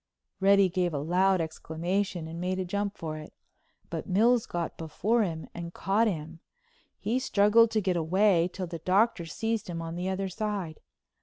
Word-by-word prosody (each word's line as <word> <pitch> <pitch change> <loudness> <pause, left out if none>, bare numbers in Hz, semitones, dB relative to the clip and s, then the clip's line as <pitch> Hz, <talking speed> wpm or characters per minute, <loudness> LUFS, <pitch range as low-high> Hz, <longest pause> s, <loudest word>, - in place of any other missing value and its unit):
Reddy 200 0 +5
gave 180 -2 -1
a - - 0
loud 180 +5 +2
exclamation 170 +2 -2
and 165 +1 -6
made 185 +1 -1
a 185 - -2
jump 200 +2 -2
for 155 -1 -5
it. 155 - -11 0.6
But - - -4
Mills 225 +5 +3
got 170 -1 -3
before 205 +9 0
him 165 -6 -2
and 170 0 -7
caught 210 +4 +2
him. 165 -3 -4 0.6
He 230 +5 -1
struggled 230 -2 +4
to 215 -1 0
get 185 -2 0
away 175 +1 +3
till 185 0 -4
the 170 -1 -6
Doctor 190 0 +2
seized 225 +5 -2
him 170 -1 -4
on 165 0 -5
the 180 +2 -3
other 190 +1 -2
side. 190 -4 -4
185 Hz, 175 wpm, -28 LUFS, 165-205 Hz, 0.6 s, Reddy